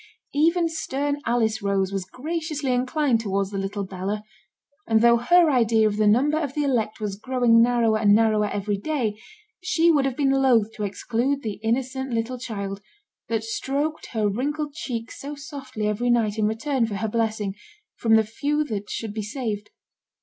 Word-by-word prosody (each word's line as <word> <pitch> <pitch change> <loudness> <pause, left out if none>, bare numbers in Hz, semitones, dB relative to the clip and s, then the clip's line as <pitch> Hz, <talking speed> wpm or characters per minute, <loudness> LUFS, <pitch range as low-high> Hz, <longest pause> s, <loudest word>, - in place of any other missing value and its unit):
Even 335 +4 +3
stern 290 -2 -2
Alice 230 -2 +1
Rose 195 -1 0
was 195 -2 -2
graciously 305 - -3
inclined 255 0 +1
towards 200 -2 -1
the 195 - -3
little 200 +1 -3
Bella; 195 +2 -4 0.6
and 225 -1 +3
though 235 0 +6
her 330 +7 +4
idea 230 -4 +3
of 210 -1 -2
the 215 -1 +3
number 280 +9 +3
of 285 -4 -3
the 295 - +1
elect 230 -6 0
was 210 -2 -3
growing 240 0 +3
narrower 230 -2 +3
and 205 -1 +5
narrower 215 -1 +3
every 205 0 -2
day, 225 -4 -2 0.4
she 340 -2 +3
would 285 -4 +3
have 265 -2 -2
been 275 -2 +2
loth 245 -5 +3
to 210 - -5
exclude 245 +7 -1
the 215 -3 -4
innocent 260 +4 -1
little 235 +2 -2
child, 200 -5 -5 0.5
that 225 -1 0
stroked 280 +7 -2
her 220 -3 0
wrinkled 290 +8 -2
cheeks 235 -7 -5
so 290 +2 -6
softly 275 -6 -6
every 210 +4 0
night 225 -3 +2
in 210 - +3
return 230 +2 0
for 210 - -4
her 215 +3 -2
blessing, 215 -3 -1 0.4
from 225 -1 +3
the 220 - +5
few 290 +8 -1
that 210 -8 -5
should 220 -2 -4
be 215 - -3
saved. 210 -2 -4
230 Hz, 180 wpm, -24 LUFS, 210-275 Hz, 0.6 s, though